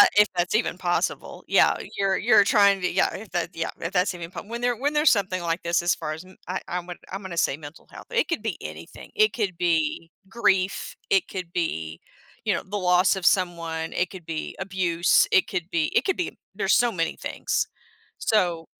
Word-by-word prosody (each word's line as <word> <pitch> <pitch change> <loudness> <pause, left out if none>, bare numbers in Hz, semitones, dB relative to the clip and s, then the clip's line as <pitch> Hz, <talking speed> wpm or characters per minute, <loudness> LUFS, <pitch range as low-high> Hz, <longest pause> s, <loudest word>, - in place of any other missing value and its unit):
if 210 0 +7
that's 175 0 0
even 215 -5 0
possible. 175 -1 -2
Yeah, - - +4 0.2
you're 195 -1 +2
you're 220 -3 +5
trying 200 -1 +5
to 180 - +1
be - - -3
yeah. 190 - +2
If 215 0 -9
that 175 -2 -1
yeah 165 0 -2
if 165 - -3
that's 185 0 +2
even 170 -1 -7
po - - -7
When 235 +3 -6
there 245 0 +1
when 285 +5 0
there's 300 +1 +5
something 185 -4 0
like 170 0 -2
this 170 0 +1
as 175 0 +2
far 155 - -4
as, 160 +3 -8
mm, 185 - -16
I 185 +2 -3
I 175 - -4
w 180 0 -6 0.2
I'm 195 +2 -4
gonna 180 -3 -6
say 135 - +1
mental 150 +1 -12
health. - - -11
It 470 -1 +2
could 335 - -2
be - - -2
anything, - - -9
it 430 0 +4
could 200 -7 -2
be 165 -1 0 0.2
grief, 190 -3 0
it 390 -3 +3
could 180 -3 -6
be, 80 - -2 0.5
you - - +2
know, - - -1
the 205 +3 -4
loss 180 0 +3
of 190 -2 -5
someone, 165 -3 +1
it 180 -1 0
could 185 -4 -10
be 160 -1 -4
abuse. 180 -3 +2
It 190 - +4
could 175 0 -3
be 165 -2 +2
it - - +3
could 385 - 0
be 360 - -3 0.2
there's 195 -1 +2
so 240 0 +3
many 165 -5 -1
things. - - -2 0.5
So, 175 -6 +1
185 Hz, 220 wpm, -25 LUFS, 170-205 Hz, 0.5 s, if